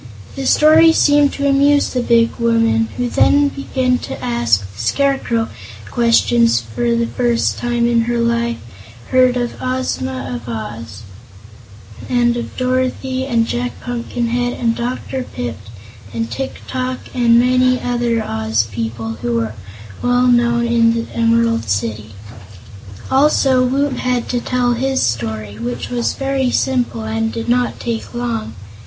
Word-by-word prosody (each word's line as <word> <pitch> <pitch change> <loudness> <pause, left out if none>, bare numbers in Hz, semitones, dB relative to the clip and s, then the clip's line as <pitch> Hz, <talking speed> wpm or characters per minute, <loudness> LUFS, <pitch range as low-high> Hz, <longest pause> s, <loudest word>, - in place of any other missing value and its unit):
The 270 -1 -3
story 320 +2 +6
seemed 290 -2 +4
to 280 0 -1
amuse 285 +1 +3
the 250 - 0
big 230 -1 +2
woman, 230 -1 +2
who 245 0 0
then 285 +4 +3
began 260 -2 -1
to - - -7
ask 120 -4 +1
the 100 - -8
Scarecrow 235 - 0 0.4
questions 235 - +3
and 115 - -17
for 235 -1 +1
the 235 0 +1
first 240 0 0
time 240 -1 0
in 235 -1 +3
her 240 0 -1
life 235 0 0 0.5
heard 255 -1 +4
of 240 -1 -3
Ozma 130 - -2
of 120 -1 -7
Oz, 115 -2 -7 1.1
and 240 -1 +2
of 240 - -6
Dorothy 255 +1 -1
and 230 -3 +2
Jack 245 +1 -3
Pumpkinhead 245 0 -2
and 230 -1 0
Dr. 250 +2 -3
Pipt 115 - -6 0.5
and 115 0 -3
Tik 270 - -5
tok 255 0 -2 0.2
and 235 -1 +4
many 255 +1 +3
other 240 -2 -1
Oz 110 - 0
people 115 +1 -4
who 120 -1 0
are 110 -1 -3 0.5
well 245 0 +2
known 240 -1 +3
in 230 -1 +3
the 230 - -4
Emerald 230 - +1
City. 105 +1 -3 1.0
Also 265 -2 +3
Woot 270 +2 0
had 250 -1 -1
to 245 -1 -1
tell 245 -1 0
his 265 +2 0
story, 110 -2 -3
which 120 - -4
was 240 -1 0
very 270 -1 -1
simple 245 -3 0
and 225 0 -2
did 230 0 -5
not 245 +1 0
take 235 0 -4
long. 230 - -3
235 Hz, 145 wpm, -17 LUFS, 220-255 Hz, 1.1 s, story